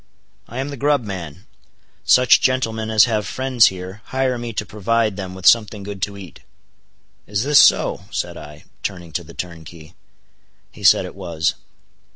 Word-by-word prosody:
"I 120 - -9
am 135 +2 -3
the 140 - -7
grub 145 0 +1
man. 90 -8 -7 0.6
Such 125 -1 +5
gentlemen 110 -4 0
as 110 -1 +5
have 110 -4 -2
friends 130 0 +3
here, 95 +2 -6
hire 130 -1 -1
me 120 0 -5
to 105 - -3
provide 110 +1 0
them 95 -2 -6
with 95 0 -10
something 105 -3 +4
good 100 -1 -8
to 100 +2 -3
eat." 95 -6 -11 0.9
"Is 105 +2 -1
this 145 +1 +5
so?" - - +4
said - - -4
I, 75 0 -12 0.2
turning 90 -4 -6
to 85 - -3
the 85 0 -14
turnkey. 80 -1 -9 0.8
He - - -14
said - - +5
it - - -9
was. 85 -3 -2
105 Hz, 170 wpm, -20 LUFS, 90-115 Hz, 0.9 s, Such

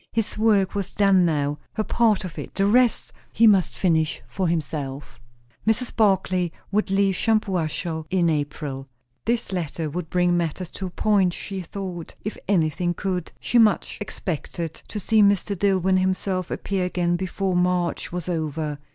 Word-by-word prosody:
His 225 -2 -1
work 210 -3 +3
was 200 -2 -3
done 195 -3 +5
now, 145 -2 0
her 215 - -1
part 220 -4 +2
of 175 - -7
it; - - -8
the 195 - +2
rest 240 +3 +3 0.2
he 230 - +4
must 200 -5 +4
finish 160 -4 +1
for 190 -2 -2
himself. 145 -4 -3 0.5
Mrs. 230 +3 0
Barclay 190 -4 +2 0.2
would 210 0 +1
leave 195 0 +3
Shampuashuh 180 -6 -1
in 180 -2 +2
April. 145 -3 -2 0.4
This 235 -3 0
letter 160 -3 -3
would 165 0 -4
bring 180 0 +2
matters 170 +1 -2
to 190 - -5
a - - -6
point, 190 -1 +2
she 195 0 -5
thought, 180 -1 -6
if 215 - -4
anything 175 -1 +1
could; 180 -3 -3
she 245 - +2
much 215 -3 +3
expected 170 -4 -4
to 210 - -5
see 220 +2 +3
Mr. 200 0 +3
Dillwyn 190 -1 +2
himself 185 -1 -1
appear 195 -2 -2
again 175 -1 0
before 185 +1 -2
March 180 -1 0
was 175 0 -4
over. 155 -3 -2
185 Hz, 160 wpm, -24 LUFS, 165-200 Hz, 0.5 s, done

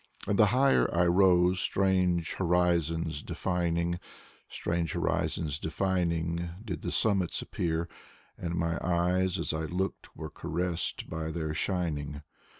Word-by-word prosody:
And 100 - 0
the 105 - +7
higher 135 +4 +3
I 90 +1 +3
rose, 90 0 +4
strange 90 -4 +1
horizons 85 -3 +1
defining, 85 -1 -1 0.5
Strange 85 -2 -2
horizons 75 -2 -1
defining, 85 -1 -1 0.2
did 90 -8 -4
the - - -3
summits 100 -5 +2
appear; 80 -1 -2 0.5
And 85 -1 -4
my 85 -1 0
eyes 90 +1 +1
as - - -2
I 80 0 -2
looked 95 +4 -3
were 80 -1 -6
caressed 85 +1 -2
by 80 -1 -4
their 80 -2 -3
shining. 75 -4 -2
85 Hz, 125 wpm, -29 LUFS, 80-90 Hz, 0.5 s, the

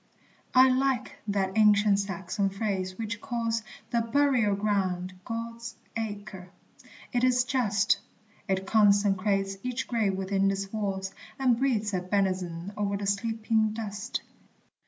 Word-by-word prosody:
I 260 +1 +8
like 260 -1 0
that 195 -2 0
ancient 210 -2 +5
Saxon 195 0 -1
phrase 190 -2 -2
which 225 -1 -4
calls 230 -1 -1 0.3
The 235 - +2
burial 235 -3 +2
ground 190 -3 -1
God's 230 +1 -5 0.2
Acre! 205 -4 -5 0.6
It 245 0 +1
is 250 -1 +4
just; 210 -6 +2 0.5
It 190 0 0
consecrates 200 -1 +3
each 250 -1 -3
grave 220 -5 +1
within 195 +1 +1
its 195 +1 -3
walls, 195 -3 -2 0.2
And 255 -3 +3
breathes 220 -6 +1
a 185 - 0
benison 185 -1 -1
o'er 200 -1 -1
the 200 - -4
sleeping 220 +1 +1
dust. 205 -2 -4
205 Hz, 125 wpm, -28 LUFS, 195-230 Hz, 0.6 s, I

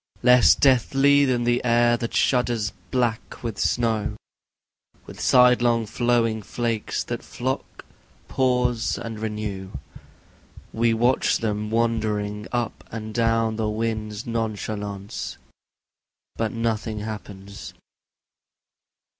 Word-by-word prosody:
Less 125 0 +7
deadly 140 +2 +4
than 125 -2 +1
the 120 +1 +1
air 120 0 +4
that 115 0 -4
shudders 120 -4 +1 0.2
black 120 -3 -2
with 115 -4 -4
snow, 110 -3 0 0.9
With - - -10
sidelong 120 -2 +4
flowing 115 0 +1
flakes 115 +1 -2
that 120 -1 -5
flock, 130 +2 -5 0.4
pause 125 -3 +1
and 115 -2 -6
renew, 105 -3 -4 1.0
We 115 0 +2
watch 120 +3 +2
them 105 -1 -2
wandering 105 -2 -1
up 120 -3 -2
and 110 -1 -6
down 115 -1 +1
the 110 -1 0
wind's 110 0 -3
nonchalance, 105 -3 -4 1.0
But 115 -1 -1
nothing 110 -2 -2
happens. 100 -2 -8
115 Hz, 100 wpm, -24 LUFS, 110-120 Hz, 1.0 s, Less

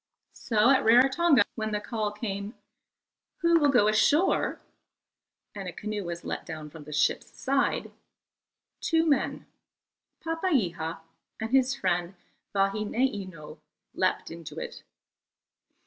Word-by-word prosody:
So 225 +2 +2
at 265 - +4
Rarotonga, 265 +4 +5
when 220 -1 -3
the 210 - 0
call 210 0 -3
came, 205 0 -5 0.9
"Who 335 0 +5
will 290 -2 +4
go 240 -6 +4
ashore?" 295 - +3 0.9
and 195 -2 -6
a - - -4
canoe 210 +3 -4
was 170 0 -5
let - - -4
down 155 -2 -8
from 155 -2 -11
the 150 - -10
ship's 150 0 +1
side, 275 +1 -1 0.9
two 325 0 +2
men, 290 -4 0 0.8
Papeiha 215 - -1 0.4
and 220 +1 -4
his 265 0 +3
friend 180 -5 -1 0.4
Vahineino, 195 -3 -1 0.3
leapt - - 0
into 165 -1 -9
it. - - -6
215 Hz, 115 wpm, -28 LUFS, 180-270 Hz, 0.9 s, Rarotonga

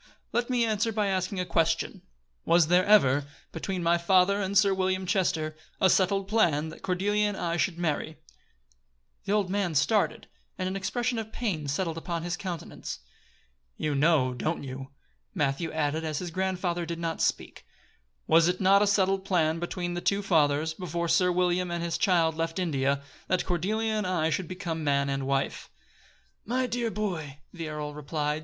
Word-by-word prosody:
"Let 240 +1 0
me 245 -2 +2
answer 220 0 0
by 210 -2 0
asking 185 0 -1
a 180 - -1
question: 165 -1 0 0.4
Was 170 -2 +4
there 180 +1 +5
ever, 145 -10 +5 0.3
between 180 +2 -3
my 170 +1 +3
father 190 +3 +3
and 195 +1 0
Sir 200 -1 +5
William 185 0 0
Chester, 165 -5 0 0.2
a 190 - +5
settled 195 +1 +2
plan 165 -8 +2
that - - -11
Cordelia 205 +3 +1
and 205 -2 -3
I 170 -1 -1
should 175 0 0
marry?" 160 -2 -2 1.1
The - - -2
old 200 -3 +1
man 195 -5 0
started, 200 +8 +1 0.3
and 185 - -2
an 190 - -3
expression 240 +5 -1
of 220 0 -6
pain 190 -12 -2
settled 165 +3 -1
upon 170 -1 -4
his 175 0 -2
countenance. 175 - -6 0.8
"You 150 - -1
know, 140 -3 +3
don't 155 +6 -2
you?" 135 0 -7 0.5
Matthew 140 +4 0
added, 155 0 -1
as 155 -2 -2
his 175 0 -4
grandfather 180 -1 -1
did 170 0 -4
not 165 -1 -3
speak. - - -2 0.6
"Was 165 +1 +5
it 180 +1 0
not 195 +1 +5
a 210 - +3
settled 195 -1 +2
plan 165 -4 +1
between 175 0 -3
the 175 - -3
two 200 +2 +1
fathers, 155 -3 +2
before 170 -1 -3
Sir 180 +1 +4
William 180 0 +1
and 170 0 -2
his 170 -1 -2
child 170 -5 +3
left 165 +1 -2
India, 140 -5 0 0.2
that 185 - +1
Cordelia 215 +6 0
and 210 -3 -1
I 165 -3 +1
should 165 +3 -1
become 175 -3 -4
man 140 -1 +1
and 135 -1 -2
wife?" 135 0 -1
175 Hz, 165 wpm, -28 LUFS, 160-195 Hz, 1.1 s, there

